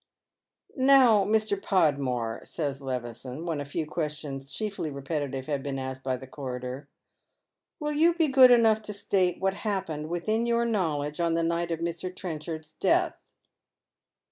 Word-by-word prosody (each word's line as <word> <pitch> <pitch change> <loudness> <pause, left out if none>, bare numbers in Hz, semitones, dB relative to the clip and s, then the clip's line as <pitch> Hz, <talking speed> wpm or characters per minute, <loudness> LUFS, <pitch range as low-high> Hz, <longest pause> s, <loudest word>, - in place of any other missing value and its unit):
"Now, 260 -6 +6
Mr. 215 -2 +1
Podmore," 135 - +1
says 140 -4 -4
Levison, 125 +3 -5
when 160 -4 -2
a - - -5
few 155 +3 -3
questions, 150 -3 -4
chiefly 200 -7 -3
repetitive, 140 -1 -3
have 145 -2 -2
been 135 0 -3
asked 130 0 -5
by 130 -1 -1
the 130 - -10
coroner, 130 0 -6 0.4
" - - -55
will 300 -1 -2
you 330 +3 +4
be 330 -2 +3
good 260 -2 +8
enough 225 -3 +5
to 210 - -4
state 185 -3 +1
what 190 0 +1
happened 190 -8 -3
within 215 +7 0
your 235 0 +2
knowledge 155 -9 -1
on 170 -1 +1
the 165 - +1
night 170 +1 0
of 165 -1 -3
Mr. 170 +2 -3
Trenchard's 160 -3 -6
death - - +3
165 Hz, 155 wpm, -28 LUFS, 140-205 Hz, 0.4 s, good